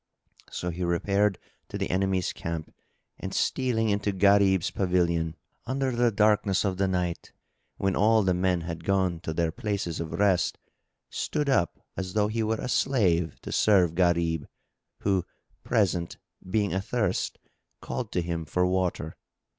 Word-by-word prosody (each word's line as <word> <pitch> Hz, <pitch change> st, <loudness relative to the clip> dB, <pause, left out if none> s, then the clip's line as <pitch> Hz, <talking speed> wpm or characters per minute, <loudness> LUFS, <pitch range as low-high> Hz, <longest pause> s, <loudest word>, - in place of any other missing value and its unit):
So 90 Hz, -, -3 dB
he 90 Hz, +2 st, -4 dB
repaired 100 Hz, +3 st, +1 dB, 0.3 s
to -, -, -4 dB
the -, -, -2 dB
enemy's 95 Hz, -1 st, 0 dB
camp 85 Hz, -2 st, -5 dB, 0.5 s
and -, -, -5 dB
stealing 115 Hz, -4 st, +1 dB
into 100 Hz, 0 st, 0 dB
Gharib's 100 Hz, -2 st, +4 dB
pavilion, 85 Hz, -4 st, +1 dB, 0.3 s
under 135 Hz, +1 st, 0 dB
the 120 Hz, 0 st, +3 dB
darkness 105 Hz, -2 st, +2 dB
of 95 Hz, -2 st, -1 dB
the 95 Hz, 0 st, +1 dB
night, 90 Hz, -2 st, -2 dB, 0.5 s
when 95 Hz, -1 st, 0 dB
all 110 Hz, +1 st, +4 dB
the 95 Hz, -1 st, +2 dB
men 90 Hz, -1 st, +1 dB
had 85 Hz, 0 st, -6 dB
gone 95 Hz, -2 st, +1 dB
to 80 Hz, -, -5 dB
their 80 Hz, 0 st, 0 dB
places 100 Hz, -2 st, -3 dB
of 80 Hz, -2 st, -4 dB
rest, 100 Hz, -3 st, +2 dB, 0.5 s
stood 150 Hz, -2 st, -1 dB
up 90 Hz, -, +1 dB, 0.2 s
as 95 Hz, -1 st, -4 dB
though 105 Hz, -1 st, +2 dB
he 115 Hz, +1 st, -1 dB
were 110 Hz, 0 st, +1 dB
a -, -, -3 dB
slave 95 Hz, -12 st, +1 dB
to -, -, -7 dB
serve 95 Hz, -6 st, +4 dB
Gharib, 85 Hz, -3 st, +1 dB, 0.5 s
who 95 Hz, -3 st, +1 dB, 0.4 s
presently, 95 Hz, -7 st, 0 dB, 0.3 s
being 105 Hz, 0 st, +1 dB
athirst, 95 Hz, +1 st, -1 dB, 0.4 s
called -, -, -5 dB
to 90 Hz, -, 0 dB
him 85 Hz, -1 st, -3 dB
for 90 Hz, +4 st, +1 dB
water. 90 Hz, -4 st, -1 dB
95 Hz, 150 wpm, -27 LUFS, 85-105 Hz, 0.5 s, Gharib's